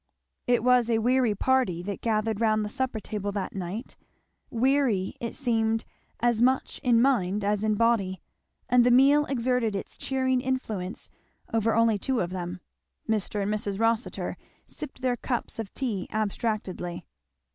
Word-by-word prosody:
It 245 -2 +3
was 250 -1 +4
a 230 - +3
weary 245 -1 +2
party 210 -8 +1
that 200 +1 -5
gathered 220 -1 0
round 215 -1 +2
the - - -4
supper 260 -1 -2
table 205 -1 -4
that 200 -2 -3
night, 195 +4 -5 0.5
weary 255 -6 +1
it 235 - -4
seemed 225 -3 0 0.4
as 235 -1 +2
much 260 +2 +2
in 240 -2 +4
mind 210 -7 +1
as 205 +1 0
in 215 -1 +2
body; 205 -5 +1 0.5
and 245 0 +5
the 245 - +4
meal 275 +4 +5
exerted 250 -4 0
its 195 - -5
cheering 260 -1 0
influence 220 -8 -3 0.4
over 225 0 +2
only 230 -2 +3
two 260 +4 0
of 175 0 -1
them; 180 -1 -5 0.5
Mr. 210 -2 0
and 205 +2 0
Mrs. 205 -2 -2
Rossitur 225 +1 0 0.3
sipped 270 -3 -8
their 250 -1 +1
cups 240 -2 -3
of 220 -3 -4
tea 225 -8 -2
abstractedly. 200 -5 -2
225 Hz, 155 wpm, -27 LUFS, 205-250 Hz, 0.5 s, and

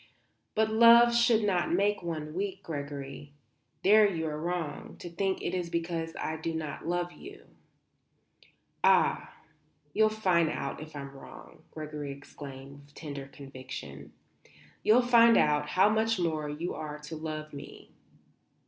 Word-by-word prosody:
But 220 0 +2
love 235 +1 +7
should 235 -2 +4
not 185 -4 +1
make 205 +3 +1
one 155 -3 -5
weak, 195 +2 -4
Gregory. 140 -1 -6 0.5
There 210 +1 +6
you 165 -3 -3
are 150 -1 -4
wrong, 170 -3 -4
to 175 - -9
think 190 +2 -1
it 175 - -2
is 180 -2 -2
because 165 -1 -3
I 160 - -3
do 160 +1 -3
not 155 -1 -5
love 175 0 -1
you." 400 - -12 1.4
"Ah, - - +3 0.6
you'll 215 0 +4
find 185 -7 +2
out 140 0 -4
if 155 0 -10
I'm 140 -1 -7
wrong!" 135 - -13
Gregory 150 -2 -6
exclaimed 140 0 -10
with 145 0 -20
tender 140 -3 -7
conviction. 130 - -9 0.7
"You'll 240 +4 +5
find 235 -1 +6
out 150 0 +2
how 190 +2 +4
much 220 +1 +1
more 155 -3 -1
you 160 +4 -4
are 150 -1 -6
to 150 +2 -8
love 155 -1 -6
me. 140 - -11
165 Hz, 145 wpm, -29 LUFS, 150-200 Hz, 1.4 s, love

